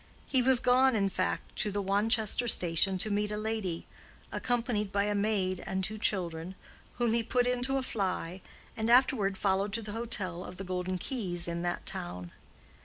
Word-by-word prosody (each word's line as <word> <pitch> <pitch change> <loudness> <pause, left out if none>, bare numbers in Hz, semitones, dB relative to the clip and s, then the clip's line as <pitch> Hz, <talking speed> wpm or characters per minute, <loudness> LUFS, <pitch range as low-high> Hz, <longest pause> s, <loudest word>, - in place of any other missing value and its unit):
He 260 - +2
was 255 0 +7
gone, 255 +1 +4
in 195 -2 +1
fact, 185 -1 -3
to 215 - +1
the 205 0 -2
Wanchester 215 +4 +1
station 185 -1 +3
to 210 +4 -1
meet 205 +1 0
a 210 - -3
lady, 215 -6 -3 0.5
accompanied 235 -4 -1
by 200 0 +1
a 205 0 0
maid 200 -3 0
and 190 0 -2
two 215 +2 -3
children, 180 -3 0 0.4
whom 240 -2 +1
he 235 - +2
put 245 +2 +1
into 250 +2 +2
a 265 - -1
fly, 185 -5 -3 0.3
and 220 +1 -1
afterward 235 -6 +4
followed 195 +1 0
to 230 0 -2
the 210 - -6
hotel 205 -6 -2
of 180 - -9
the 195 - -5
Golden 185 0 -2
Keys, 180 -6 -2
in 170 0 -3
that 175 0 -3
town. 90 0 -3
205 Hz, 180 wpm, -30 LUFS, 185-230 Hz, 0.5 s, was